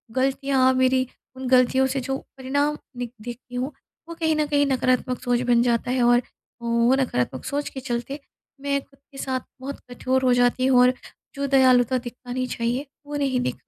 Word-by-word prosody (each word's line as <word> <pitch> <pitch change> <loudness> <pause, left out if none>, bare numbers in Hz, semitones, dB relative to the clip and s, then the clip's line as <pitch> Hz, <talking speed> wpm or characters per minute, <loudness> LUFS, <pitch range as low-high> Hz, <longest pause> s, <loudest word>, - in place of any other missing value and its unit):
गलतियाँ, 265 0 +2
मेरी 260 0 +2 0.3
उन 260 0 -5
गलतियों 260 +1 +4
से 275 - -1
जो 270 +1 -2 0.2
परिणाम 285 +3 0 0.2
निक 245 -1 -5
देखती 245 +2 -9
हूँ, 255 +4 -2 0.4
वो 335 - -6
कहीं 320 -1 +1
न 305 0 +1
कहीं 285 0 +3
नकारात्मक 255 -1 +1
सोच 245 -1 +1
बन 235 -1 +5
जाता 240 0 +1
है 255 -1 +2
और 240 0 +5 0.4
वो 235 +1 +2
नकारात्मक 130 - -1
सोच 285 +1 -2
के 265 - -7
चलते, 255 +2 -4 0.4
मैं 280 0 0
ख़ुद 275 0 -25
के 275 - -13
साथ 260 -1 -2 0.2
बहुत 275 +1 -6
कठोर 260 +2 0
हो 250 - +5
जाती 245 +1 +2
हूँ 255 -2 +5
और 250 0 +5 0.4
जो 280 0 -2
दयालुता 255 -2 +4
दिखानी 250 +1 -5
चाहिए, 245 +4 -2 0.2
वो 295 0 -6
नहीं 275 -3 0
दि 250 - -1
255 Hz, 185 wpm, -24 LUFS, 245-270 Hz, 0.4 s, बन